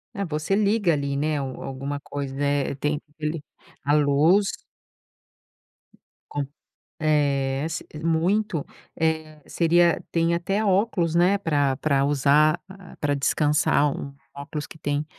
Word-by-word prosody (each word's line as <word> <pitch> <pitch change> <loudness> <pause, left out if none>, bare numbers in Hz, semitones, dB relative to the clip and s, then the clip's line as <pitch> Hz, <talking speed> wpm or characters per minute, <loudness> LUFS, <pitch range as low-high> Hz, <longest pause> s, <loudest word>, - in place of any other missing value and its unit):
É 200 - -2
você 155 +3 -1
liga 205 -4 +2
ali, 140 -1 -1
né, 150 +1 0
alguma 135 +1 -5
coisa 140 -1 -6
é 140 -1 0
tem 150 +2 -1 0.2
ali, 155 0 -3 0.4
a 145 - +2
luz. 150 +7 +3 1.8
Com 145 -1 -3 0.5
eh, 140 -3 +1
s 165 0 -4 0.2
muito, 165 +1 +1 0.3
eh, 160 -1 -1
seria 170 0 +3
tem 165 0 +2
até 195 +5 0
óculos, 190 -4 +1
né, 180 +4 +4
pra 145 -7 +1
pra 140 -2 +1
usar, 145 +2 +3 0.4
pra 145 -1 +1
descansar, 145 0 +2
um 140 - -7 0.2
óculos 145 +1 -6
que - - -13
tem 145 0 -2
150 Hz, 125 wpm, -24 LUFS, 140-170 Hz, 1.8 s, né